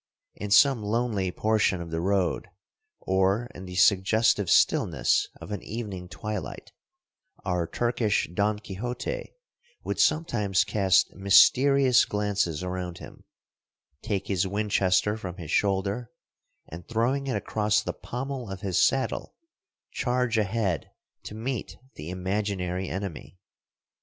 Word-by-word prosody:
In 105 - -6
some 125 +4 +5
lonely 105 -3 -1
portion 105 -2 +1
of 85 -1 -7
the 80 0 -2
road, 95 -3 0 0.5
or 95 +5 +1
in 95 - -9
the 90 0 -8
suggestive 100 +2 +3
stillness - - +3
of - - -9
an 105 - -4
evening 100 -6 -6
twilight, 105 +5 -6 0.7
our 90 -2 0
Turkish 120 -1 0
Don 105 +3 +1
Quixote 120 - -5 0.5
would - - -3
sometimes 105 - +2
cast 100 -2 +2
mysterious 125 +7 +5
glances 100 -6 -1
around 90 -1 -4
him, - - -12 0.8
take 100 -2 -2
his 95 -1 0
Winchester 100 0 +1
from 90 -4 -7
his 85 -5 -7
shoulder, 100 +4 0 0.6
and 85 +2 -10
throwing 125 +5 0
it 130 - -1
across 105 -1 0
the - - -3
pommel 125 -2 -5
of 95 -1 -7
his 95 -4 +1
saddle, 135 0 0 0.6
charge 125 -1 0
ahead 105 -6 -1 0.4
to 105 - -7
meet 120 +2 -4 0.2
the 75 +3 -8
imaginary 95 -1 -2
enemy. 95 -2 -6
100 Hz, 120 wpm, -27 LUFS, 95-115 Hz, 0.8 s, some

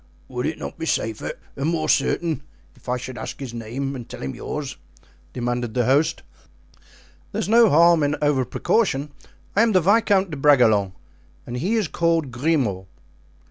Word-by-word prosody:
"Would - - -2
it - - -3
not - - -7
be - - -3
safer - - -2 0.2
and 140 +3 -1
more 165 -2 -1
certain 165 -3 +1 0.3
if - - -12
I 125 - +1
should 125 0 -7
ask - - -6
him 140 - -4
his 120 - -8
name 125 +5 -4
and 120 -3 -8
tell - - -8
him 65 - -3
yours?" 145 -3 -5 0.5
demanded 120 -2 -3
the 125 -2 +2
host. 140 +5 +2 1.1
"There - - -3
is - - -2
no 230 +1 +6
harm 170 +1 +5
in 145 0 +1
over 145 -3 +2
precaution. 150 - 0 0.4
I 205 - +5
am 230 -1 +3
the 185 - +6
Viscount 195 0 +3
de 150 - -4
Bragelonne 115 -9 +4 0.5
and 120 - -5
he 185 - 0
is 215 -6 +1
called 165 -4 0
Grimaud." 120 - 0
145 Hz, 180 wpm, -23 LUFS, 125-170 Hz, 1.1 s, no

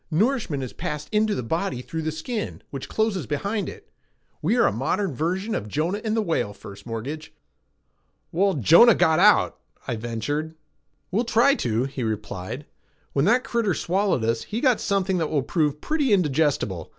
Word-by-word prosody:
Nourishment 185 - 0
is 125 - -6
passed 150 0 -5
into 215 0 +2
the 125 - -3
body 160 -1 -2
through 160 +4 -4
the 160 0 -2
skin, 210 +8 -5
which 135 -2 -6
closes 220 -6 0
behind 200 +7 -2
it. - - -13 0.5
We 190 +10 +2
are - - +5
a - - +3
modern 145 - -1
version 185 - -2
of 105 - -3
Jonah 165 - -1
and 220 0 0
the 220 - +2
whale, 160 - -1
First 100 +1 -12
Mortgage." 130 +8 -5 1.0
"Well, 195 +2 +2
Jonah 170 - +7
got 160 -2 +3
out," 210 +2 +4 0.3
I 120 - -1
ventured. 120 +8 -3 0.6
"We'll 215 +6 +1
try 245 +4 +4
to," 120 - 0
he 135 0 -5
replied. 110 +3 -4 0.5
"When 140 +1 +2
that 245 +5 +4
critter 225 -7 0
swallowed 185 - 0
us, 115 0 0
he 215 - -3
got 255 -4 +3
something 190 -2 0
that 160 - -1
will 145 -4 0
prove 150 0 0
pretty 300 -5 0
indigestible. 145 - +1
160 Hz, 175 wpm, -24 LUFS, 130-205 Hz, 1.0 s, Jonah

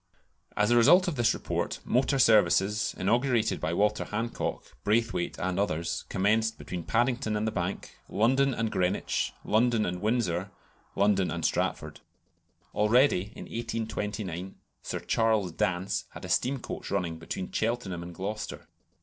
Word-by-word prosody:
As 105 +2 +3
a - - +5
result 165 +11 +6
of 175 - -1
this 120 -3 +2
report, - - -2
motor 135 +3 +2
services, 105 -3 +3
inaugurated 120 +3 +1
by - - -1
Walter 105 +4 +1
Hancock, 115 +3 -4
Braithwayte, 110 -3 0
and 95 +1 -1
others, 85 -4 -1
commenced 110 +4 +1
between 90 -2 -6
Paddington 120 -2 +1
and 105 - -1
the 110 - 0
Bank, 90 +1 -4
London 130 +6 +3
and 115 -3 -1
Greenwich, 90 +1 0
London 115 0 +2
and 90 +1 -3
Windsor, 105 -5 0 0.5
London 100 -2 +2
and - - -3
Stratford. - - -1 0.7
Already, 105 -2 +3
in - - -8
1829, 105 -5 -4 0.3
Sir - - -4
Charles 110 -5 +1
Dance 90 +3 -1
had - - -8
a - - -8
steam 135 +3 +1
coach 120 - -7
running 85 -2 -2
between 85 +2 -5
Cheltenham 110 -6 -2
and 85 0 -8
Gloucester. 105 +4 -5
105 Hz, 140 wpm, -28 LUFS, 95-115 Hz, 0.7 s, result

